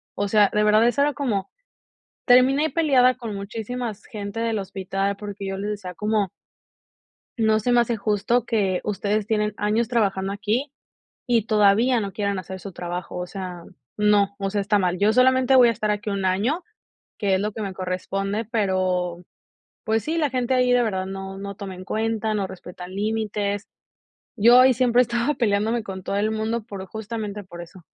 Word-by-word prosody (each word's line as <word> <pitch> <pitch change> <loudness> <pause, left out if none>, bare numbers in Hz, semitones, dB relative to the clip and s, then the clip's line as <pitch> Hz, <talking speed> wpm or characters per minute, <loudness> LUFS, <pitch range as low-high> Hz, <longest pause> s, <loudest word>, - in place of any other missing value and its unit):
O 205 - -1
sea, 205 -1 +5
de 210 - +2
verdad, 215 +2 +5
eso 240 +4 +1
era 290 +1 +2
como, 215 -10 -2 0.8
terminé 265 +4 +5
peleada 265 -6 +4
con 230 -4 -6
muchísimas 220 +2 -5
gente 205 -2 -6
del 230 -1 0
hospital 195 0 -2
porque 205 -1 -7
yo 195 0 -3
les 200 +2 -3
decía 195 -4 -6
como 210 0 0 1.1
no 220 -1 +3
se 245 +3 0
me 245 - +5
hace 235 0 0
justo 210 +3 +1
que 195 -6 0
ustedes 210 +1 -1
tienen 210 -1 0
años 215 +3 +1
trabajando 195 -5 0
aquí 220 +7 -1 0.6
y 235 -4 +2
todavía 215 +4 +4
no 200 -2 -4
quieran 200 -1 -1
hacer 190 0 -7
su 195 +1 -8
trabajo, 175 +1 -5
o 180 0 -3
sea, 180 -2 -7 0.3
no, 205 -1 +3
o 195 -1 -2
sea, 205 0 0
está 205 +1 +2
mal. 180 -2 0
Yo 205 +3 +3
solamente 260 +2 +4
voy 245 -2 +7
a - - +4
estar 215 -1 -2
aquí 210 0 -2
1 200 -1 -2
año, 210 - +1 0.6
que 200 -2 +1
es 190 - +1
lo 210 +1 -2
que 220 - -5
me 195 -2 -3
corresponde, 195 +3 -3
pero, 185 -5 0 0.6
pues 220 -1 0
sí, 320 +7 -2
la 305 -3 +1
gente 255 0 0
ahí 250 0 +3
de 245 0 +4
verdad 190 -4 -1
no 195 0 -6
no 200 0 -6
toma 195 -1 -7
en 185 +1 -10
cuenta, 220 +1 -1
no 200 -2 -1
respetan 180 -1 -10
límites. 210 -1 -2 0.7
Yo 240 +3 +7
ahí 260 +1 +6
siempre 245 0 +4
estaba 240 +4 0
peleándome 225 0 +1
con 190 -2 -7
todo 195 - -3
el 210 +2 +1
mundo 220 +1 -2
por 200 -4 -7
justamente 215 0 -5
por 175 -2 -10
eso. 175 +1 -13
210 Hz, 185 wpm, -23 LUFS, 195-230 Hz, 1.1 s, voy